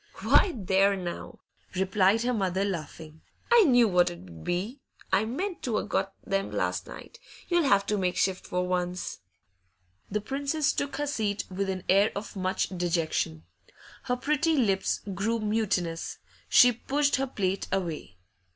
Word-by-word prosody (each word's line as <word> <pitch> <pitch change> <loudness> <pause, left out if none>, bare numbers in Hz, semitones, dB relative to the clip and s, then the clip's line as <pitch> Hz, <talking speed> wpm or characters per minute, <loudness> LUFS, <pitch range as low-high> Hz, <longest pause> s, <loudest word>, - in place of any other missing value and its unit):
'Why, 370 - +4
there 195 0 +3
now,' 175 -2 -6 0.4
replied 190 +3 +2
her 250 +1 +1
mother, 190 -3 0
laughing; 160 -3 -6 0.3
'I 470 -4 +7
knew 245 -5 +5
what 180 -3 +3
it - - -6
'ud 85 -2 -12
be! 200 +10 -2 0.3
I 195 +3 +4
meant 350 - -3
to 230 -4 -1
a' - - -1
got 195 -1 -1
them 195 0 -1
last - - -2
night. - - -11 0.3
You'll 345 -3 +3
have 200 -6 +4
to 210 0 0
make 180 -1 0
shift 190 -1 0
for 180 0 -1
once.' 180 0 -2 0.9
The 210 - -1
Princess 280 +6 -1
took 285 0 -2
her 290 - -1
seat 215 -8 -2
with 195 +1 -2
an 185 -1 -3
air 200 +3 +4
of 205 +2 -6
much 185 0 -1
dejection. 165 - -1 0.6
Her 250 - +1
pretty 300 +5 +1
lips 195 -7 +1
grew 215 +5 0
mutinous; 210 -6 -1 0.3
she 245 -1 +7
pushed 280 +5 0
her 270 +1 -1
plate 195 -6 -2
away. 165 - -3
195 Hz, 160 wpm, -28 LUFS, 180-245 Hz, 0.9 s, I